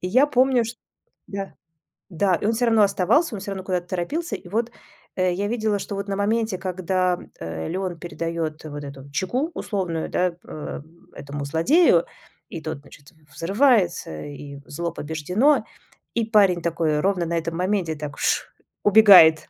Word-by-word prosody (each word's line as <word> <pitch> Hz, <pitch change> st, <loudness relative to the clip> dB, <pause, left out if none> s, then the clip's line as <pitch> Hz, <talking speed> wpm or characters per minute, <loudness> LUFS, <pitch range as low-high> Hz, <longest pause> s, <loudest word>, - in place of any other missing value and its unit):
И 180 Hz, -, -3 dB
я 255 Hz, +8 st, +5 dB
помню, 255 Hz, -3 st, +3 dB
ш 230 Hz, -, -5 dB, 0.6 s
да, 195 Hz, -1 st, -5 dB, 0.6 s
да, 185 Hz, +2 st, +2 dB
и 205 Hz, -, -3 dB
он 225 Hz, -, +2 dB
всё 240 Hz, +2 st, +1 dB
равно 225 Hz, -2 st, +4 dB
оставался, 205 Hz, -, +2 dB
он 195 Hz, -, -5 dB
всё 200 Hz, -, -6 dB
равно 190 Hz, -1 st, -5 dB
куда-то 180 Hz, -2 st, -2 dB
торопился. 285 Hz, -, -2 dB
И 175 Hz, -, -14 dB
вот, 230 Hz, +4 st, -1 dB, 0.5 s
э, 185 Hz, -1 st, +2 dB
я 200 Hz, +2 st, -1 dB
видела, 215 Hz, -3 st, 0 dB
что 200 Hz, -, -5 dB
вот 200 Hz, 0 st, -4 dB
на 195 Hz, -, -1 dB
моменте, 220 Hz, -1 st, 0 dB
когда, 185 Hz, -1 st, 0 dB, 0.2 s
э, 80 Hz, -1 st, -5 dB
Леон 185 Hz, -1 st, -3 dB
передает 165 Hz, -2 st, -4 dB
вот 145 Hz, -1 st, -6 dB
эту 140 Hz, 0 st, -10 dB
чеку 245 Hz, -, -1 dB
условную, 180 Hz, -6 st, -3 dB
да, 180 Hz, -1 st, +1 dB
э, 150 Hz, -1 st, -6 dB, 0.3 s
этому 140 Hz, 0 st, -6 dB
злодею 170 Hz, -, +4 dB, 0.4 s
и 165 Hz, -, -6 dB
тот, 155 Hz, -3 st, -5 dB
значит, 145 Hz, +2 st, -17 dB, 0.2 s
взрывается, 190 Hz, -, +2 dB
и 145 Hz, -1 st, -9 dB
зло 170 Hz, +2 st, -4 dB
побеждено. 180 Hz, -, +1 dB, 0.5 s
И 230 Hz, -1 st, +1 dB
парень 200 Hz, -6 st, +4 dB
такой 160 Hz, -3 st, 0 dB
ровно 185 Hz, -1 st, +1 dB
на 170 Hz, +1 st, -1 dB
этом 165 Hz, 0 st, -4 dB
моменте 185 Hz, -3 st, 0 dB
так- 145 Hz, -2 st, -7 dB
ш!- -, -, +1 dB, 0.4 s
убегает. 195 Hz, -7 st, +8 dB
185 Hz, 165 wpm, -23 LUFS, 160-210 Hz, 0.6 s, убегает